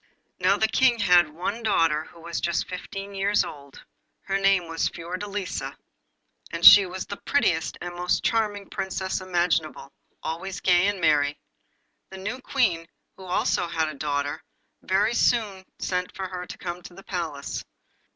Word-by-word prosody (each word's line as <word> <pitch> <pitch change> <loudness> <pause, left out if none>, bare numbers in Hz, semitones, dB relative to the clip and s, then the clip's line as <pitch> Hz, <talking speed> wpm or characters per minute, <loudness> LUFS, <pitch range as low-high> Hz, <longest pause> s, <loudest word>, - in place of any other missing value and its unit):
Now - - +3
the 220 - +3
King 245 +1 +3
had 180 -7 +5
one 180 +9 -4
daughter, 165 -8 +2
who 170 - -16
was 170 0 -4
just 170 -1 0
fifteen 195 +2 -7
years 200 +1 +2
old. 140 -2 -10 0.4
Her 195 0 -1
name 195 -3 +3
was 165 0 -1
Fiordelisa, 185 +3 -5 0.7
and - - -2
she 200 -2 +11
was 185 +1 -5
the 200 - -6
prettiest 170 - +1
and 175 0 -5
most 180 0 0
charming 210 -3 0
Princess 190 0 -3
imaginable, 175 -5 -1 0.3
always 175 +4 -4
gay 180 +1 +4
and 205 -1 -1
merry. 145 -3 +2 0.7
The 190 - -9
new 215 +7 -5
Queen, 180 -13 0 0.3
who 190 - -12
also 180 -1 0
had 160 -2 -1
a - - -6
daughter, 145 0 -2 0.4
very 205 +5 +1
soon 210 -6 +1
sent 180 0 -3
for 190 -1 -4
her 180 -1 -6
to - - -8
come 175 0 -5
to 175 - -12
the 195 - -12
Palace. 160 -6 -4
180 Hz, 160 wpm, -25 LUFS, 165-200 Hz, 0.7 s, she